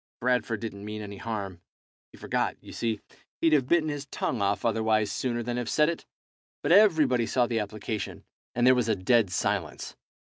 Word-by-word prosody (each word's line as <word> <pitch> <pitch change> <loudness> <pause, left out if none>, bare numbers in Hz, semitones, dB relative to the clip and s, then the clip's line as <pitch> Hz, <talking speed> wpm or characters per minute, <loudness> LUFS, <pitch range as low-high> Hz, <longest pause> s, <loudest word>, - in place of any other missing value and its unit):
Bradford 120 -3 0
didn't 100 -3 -6
mean 105 0 -5
any 100 -1 -8
harm; 100 -6 -5 0.5
he - - -15
forgot, - - -1
you - - -12
see. 115 -3 -2 0.4
He'd 165 -1 +3
have 135 -4 +3
bitten 160 0 +3
his 145 -2 -5
tongue 125 -4 -2
off 100 +2 0
otherwise 110 -2 +2
sooner 120 -2 -2
than 120 +1 -3
have 120 - -2
said 150 +1 +3
it. 170 - -5 0.6
But 145 - +1
everybody 155 - +5
saw 125 -2 +2
the 115 -1 -1
application, 105 +1 -4 0.3
and 120 +1 +2
there 130 - +8
was 125 -3 +1
a 110 - +3
dead 105 +2 +3
silence. - - -2
115 Hz, 185 wpm, -27 LUFS, 105-130 Hz, 0.6 s, there